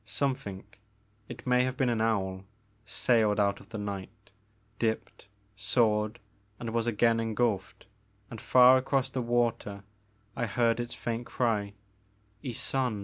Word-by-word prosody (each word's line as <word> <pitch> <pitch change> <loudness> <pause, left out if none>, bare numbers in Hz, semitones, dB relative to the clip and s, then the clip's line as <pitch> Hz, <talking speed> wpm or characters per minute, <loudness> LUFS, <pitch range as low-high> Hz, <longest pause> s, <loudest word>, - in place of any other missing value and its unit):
Something 105 -3 -3 0.3
— 105 0 -38
it 120 0 -9
may 125 0 +4
have 130 0 -2
been 130 - +2
an 115 -2 +1
owl 95 -4 0 0.2
— 105 +1 -38
sailed 110 -2 +2
out 100 -1 +2
of 100 - -17
the 115 - -6
night, 100 0 -7 0.5
dipped, 110 -3 -2 0.3
soared, 105 +1 +1 0.4
and 115 -2 -4
was 115 0 0
again 115 0 +3
engulfed, 110 -4 -1 0.5
and 115 - -7
far 125 +1 +7
across 130 0 0
the 130 - -2
water 115 -4 -1 0.5
I 115 - -1
heard 115 +2 +1
its 120 0 -4
faint 120 +1 -4
cry, 105 -5 0 0.7
Ysonde. 125 -2 -1
115 Hz, 145 wpm, -29 LUFS, 105-120 Hz, 0.7 s, far